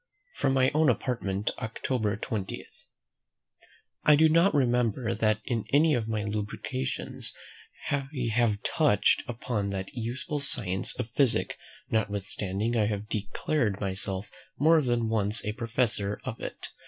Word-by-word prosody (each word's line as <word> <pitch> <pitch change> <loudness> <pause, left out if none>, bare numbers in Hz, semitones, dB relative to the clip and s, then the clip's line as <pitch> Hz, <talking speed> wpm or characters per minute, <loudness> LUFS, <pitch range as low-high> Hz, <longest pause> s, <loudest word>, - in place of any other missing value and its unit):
From 135 - +1
my 130 0 +4
own 155 -1 +4
Apartment, 110 -5 -1
October 110 -2 -1
20. 105 -2 -4 1.4
I 150 - +7
do 160 +2 +5
not 170 +5 +5
remember 120 -3 +2
that 110 -1 +1
in 115 -4 -1
any 150 +2 +5
of 115 -4 0
my 110 -2 -1
lucubrations 105 -10 -3 0.6
I 140 -2 0 0.3
have 110 -3 +2
touched 150 - +3
upon 115 -4 -2
that 95 -1 -4
useful 130 +6 -3
science 100 -9 -1
of 110 - -4
physic, 130 0 +2 0.4
notwithstanding 105 0 -1
I 110 -3 +3
have 105 0 -3
declared 105 +1 -1
myself 95 0 -3 0.3
more 160 +2 +5
than 120 -4 +1
once 110 -1 +1
a 105 - -1
professor 115 -3 -1
of 130 -4 -5
it. - - -5
115 Hz, 130 wpm, -28 LUFS, 105-130 Hz, 1.4 s, I